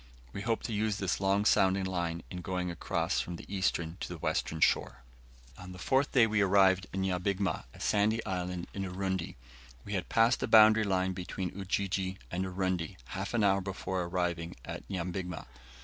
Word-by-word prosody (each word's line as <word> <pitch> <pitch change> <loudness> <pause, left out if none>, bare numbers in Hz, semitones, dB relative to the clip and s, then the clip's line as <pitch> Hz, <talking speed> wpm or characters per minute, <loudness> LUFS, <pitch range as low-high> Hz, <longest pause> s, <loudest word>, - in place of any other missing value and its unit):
We 100 - -5
hope 115 +1 -1
to 115 - -3
use 105 -1 0
this 95 -1 -1
long 100 +1 +2
sounding 95 -2 +4
line 85 -3 -2
in 90 - -5
going 90 0 -2
across 85 - -1
from 90 - -3
the - - -10
eastern 90 -3 -1
to - - -4
the 90 - -6
western 80 0 -1
shore. 65 -4 +2 0.6
On 90 0 -9
the - - -10
fourth 135 +8 +1
day 125 -4 +6
we 110 -1 +1
arrived 95 -1 +4
at 95 - -6
Nyabigma, 95 -1 -1
a - - -15
sandy 110 +2 +1
island 90 -1 -3
in 100 - -4
Urundi. 95 -1 -3 0.5
We 100 - -5
had 95 -3 -2
passed 115 +2 +4
the - - -1
boundary 110 0 +7
line 95 -1 +1
between 90 0 -5
Ujiji 95 -1 -1
and 90 +2 -1
Urundi 95 -3 -2
half 95 +5 -4
an 110 - +2
hour 100 -1 +3
before 95 -1 -3
arriving 85 -1 -2
at - - -6
Nyabigma. 90 -1 -4
95 Hz, 180 wpm, -31 LUFS, 90-100 Hz, 0.6 s, boundary